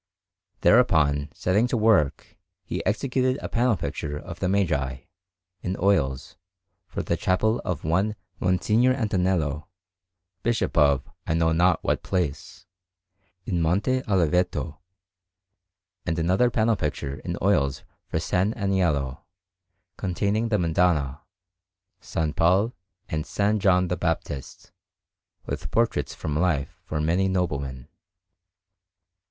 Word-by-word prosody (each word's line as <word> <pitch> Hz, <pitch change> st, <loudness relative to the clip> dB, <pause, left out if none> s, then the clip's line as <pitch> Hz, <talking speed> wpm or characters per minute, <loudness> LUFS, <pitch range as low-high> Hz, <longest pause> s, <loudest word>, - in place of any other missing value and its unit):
Thereupon, 75 Hz, -11 st, +4 dB
setting 105 Hz, +6 st, +1 dB
to 120 Hz, -, 0 dB
work, 105 Hz, -10 st, +2 dB, 0.3 s
he -, -, -4 dB
executed 130 Hz, 0 st, +1 dB
a -, -, -5 dB
panel 120 Hz, -2 st, +1 dB
picture 75 Hz, -1 st, -4 dB
of 85 Hz, +3 st, -9 dB
the 90 Hz, -, 0 dB
Magi, 70 Hz, -10 st, 0 dB, 0.6 s
in 95 Hz, +1 st, -3 dB
oils, 75 Hz, -9 st, +1 dB, 0.5 s
for -, -, -4 dB
the -, -, 0 dB
chapel 110 Hz, +5 st, +1 dB
of 90 Hz, -6 st, -3 dB
one 95 Hz, +7 st, +1 dB, 0.3 s
M. 90 Hz, 0 st, +3 dB
Antonello, 95 Hz, -, +1 dB, 0.7 s
Bishop 120 Hz, 0 st, 0 dB
of 70 Hz, -2 st, +3 dB, 0.2 s
I 80 Hz, -, +1 dB
know 80 Hz, 0 st, +2 dB
not 85 Hz, +1 st, +3 dB
what -, -, 0 dB
place, 90 Hz, -7 st, -3 dB, 0.8 s
in 90 Hz, -4 st, -1 dB
Monte 100 Hz, +11 st, +1 dB
Oliveto, 90 Hz, -4 st, +1 dB, 1.3 s
and 85 Hz, -1 st, 0 dB
another 90 Hz, +9 st, +3 dB
panel 115 Hz, -1 st, +2 dB
picture 70 Hz, -4 st, -3 dB
in -, -, -4 dB
oils 75 Hz, -9 st, +1 dB, 0.2 s
for -, -, -2 dB
S. -, -, -4 dB
Aniello, 90 Hz, -, +1 dB, 0.8 s
containing 100 Hz, +4 st, 0 dB
the 105 Hz, -, +2 dB
Madonna, 80 Hz, -5 st, +1 dB, 0.8 s
S. -, -, -10 dB, 0.2 s
Paul, 95 Hz, +8 st, +3 dB, 0.3 s
and 80 Hz, 0 st, -2 dB
S. 100 Hz, +4 st, 0 dB
John 90 Hz, -2 st, +3 dB
the 90 Hz, 0 st, -2 dB
Baptist, 80 Hz, -5 st, -4 dB, 0.7 s
with -, -, -4 dB
portraits 115 Hz, 0 st, 0 dB
from 75 Hz, -2 st, -4 dB
life 85 Hz, -6 st, 0 dB
for 75 Hz, -, -3 dB
many 85 Hz, +5 st, +2 dB
noblemen. 70 Hz, -8 st, -2 dB
90 Hz, 115 wpm, -25 LUFS, 75-100 Hz, 1.3 s, Thereupon